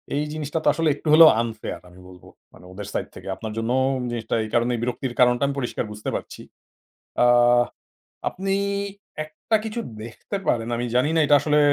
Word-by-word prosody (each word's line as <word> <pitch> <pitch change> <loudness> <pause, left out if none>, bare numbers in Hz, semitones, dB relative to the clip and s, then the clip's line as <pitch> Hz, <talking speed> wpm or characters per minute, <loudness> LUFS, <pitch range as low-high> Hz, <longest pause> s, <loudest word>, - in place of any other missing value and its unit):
এই 145 - 0
জিনিসটা 155 +1 -3
তো - - -1
আসলে 165 -1 +1
একটু 150 - -11
হলেও 160 0 +10
unfair 115 -2 -5
আমি 90 +1 -17
বলবো, 90 -1 -15 0.3
মানে - - -16
ওদের 100 +2 -8
সাইড - - -2
থেকে। - - -11
আপনার 110 +1 -6
জন্যও 120 +3 0 0.2
ওম 125 - -4
জিনিসটা 120 -1 -2
এই 110 - -6
কারণেই 120 0 +1
বিরক্তির 125 +1 -3
কারণটা 125 +1 +4
আমি 140 - -3
পরিষ্কার 120 -2 -3
বুঝতে 105 0 -5
পারছি। - - -6 0.8
আ - - +6 1.0
আপনি 195 +1 -2 0.7
একটা 155 +8 -1
কিছু 220 +1 -3 0.2
দেখতে 120 - -6
পারেন, 115 -1 0
আমি 120 - -2
জানিনা 150 +6 +2
এটা 145 - +6
আসলে 150 +1 +2
125 Hz, 180 wpm, -23 LUFS, 115-155 Hz, 1.0 s, হলেও